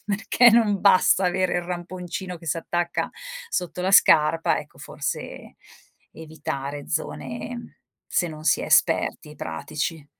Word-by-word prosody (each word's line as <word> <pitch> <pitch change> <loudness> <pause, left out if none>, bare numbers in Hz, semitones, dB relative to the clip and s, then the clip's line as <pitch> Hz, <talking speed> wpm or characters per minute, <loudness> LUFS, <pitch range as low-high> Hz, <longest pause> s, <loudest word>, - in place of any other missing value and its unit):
perché 220 +4 +4
non 215 -4 +3
basta 190 -1 +4
avere 180 0 +1
il 175 - -1
ramponcino 180 +1 -6
che 165 - -14
s'attacca 170 +2 -2 0.4
sotto 180 - -3
la 185 - 0
scarpa, 165 -3 +4
ecco - - -16
forse - - -6 0.6
evitare 145 -3 -6
zone 135 - -5 0.3
se 175 - 0
non 155 -1 -10
si - - +3
è - - -4
esperti, 150 - +1
pratici. 150 - -5
175 Hz, 125 wpm, -24 LUFS, 155-185 Hz, 0.6 s, perché